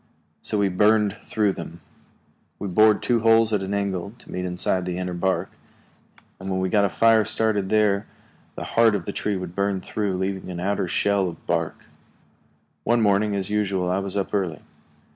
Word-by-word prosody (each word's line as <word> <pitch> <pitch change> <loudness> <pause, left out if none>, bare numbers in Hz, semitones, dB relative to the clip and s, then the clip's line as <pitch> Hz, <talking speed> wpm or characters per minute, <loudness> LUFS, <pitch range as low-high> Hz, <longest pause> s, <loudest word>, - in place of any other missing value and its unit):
So 105 - -2
we 100 -1 +2
burned 105 +2 +3
through 105 -3 0
them. 85 -2 -8 0.8
We 100 - -5
bored 105 +3 +4
two 120 -2 +2
holes 115 0 +4
at 105 - +1
an 95 +1 -3
angle 100 -1 -2
to - - -14
meet 90 0 -3
inside 90 +1 -1
the 90 -1 -3
inner 90 -1 -3
bark, 95 +2 -1 0.9
and 95 +1 -6
when 95 -1 -1
we 95 0 0
got 100 +2 +3
a - - +1
fire 115 +2 +4
started 105 -3 0
there 105 -2 +2 0.5
the - - -5
heart 115 -2 +3
of 95 -4 -4
the - - -4
tree 105 -2 -1
would 90 -2 -6
burn 100 -1 0
through, 100 0 -2
leaving 95 0 -3
an 90 -1 -5
outer 100 +1 -1
shell 100 +1 +1
of 85 - -12
bark. 85 -2 -2 1.0
One 120 -1 +2
morning, 100 0 +2
as 100 0 -3
usual, 95 -4 0
I 95 - +1
was 100 0 -4
up 100 - -2
early. 90 -7 -1
100 Hz, 190 wpm, -24 LUFS, 95-105 Hz, 1.0 s, bored